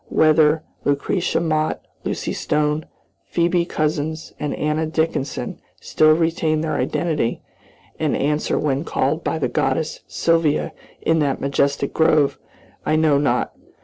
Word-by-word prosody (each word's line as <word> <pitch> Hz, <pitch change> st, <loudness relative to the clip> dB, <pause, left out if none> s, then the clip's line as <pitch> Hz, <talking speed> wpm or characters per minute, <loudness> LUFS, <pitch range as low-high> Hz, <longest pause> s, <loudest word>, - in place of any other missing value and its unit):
Whether 155 Hz, 0 st, +4 dB, 0.2 s
Lucretia 145 Hz, +6 st, 0 dB
Mott, 155 Hz, -1 st, 0 dB, 0.2 s
Lucy -, -, -3 dB
Stone, 150 Hz, +1 st, 0 dB, 0.4 s
Phoebe 170 Hz, 0 st, +1 dB
Couzins, 155 Hz, 0 st, -2 dB
and 150 Hz, -, -2 dB
Anna 150 Hz, +1 st, 0 dB
Dickinson 160 Hz, -3 st, -2 dB, 0.2 s
still 155 Hz, 0 st, +4 dB
retain 160 Hz, -1 st, +1 dB
their 160 Hz, -1 st, -2 dB
identity, 145 Hz, 0 st, -1 dB, 0.6 s
and 155 Hz, -2 st, +1 dB
answer 150 Hz, +2 st, 0 dB
when 140 Hz, -1 st, 0 dB
called 155 Hz, 0 st, -1 dB
by -, -, -1 dB
the 140 Hz, -5 st, 0 dB
goddess 135 Hz, +5 st, -1 dB
Sylvia 165 Hz, -3 st, +1 dB, 0.3 s
in 160 Hz, 0 st, +3 dB
that 140 Hz, -3 st, 0 dB
majestic 140 Hz, 0 st, 0 dB
grove, 155 Hz, -3 st, +3 dB, 0.4 s
I 155 Hz, -, +1 dB
know 155 Hz, -3 st, +4 dB
not. 125 Hz, -4 st, 0 dB
155 Hz, 125 wpm, -21 LUFS, 145-160 Hz, 0.6 s, Whether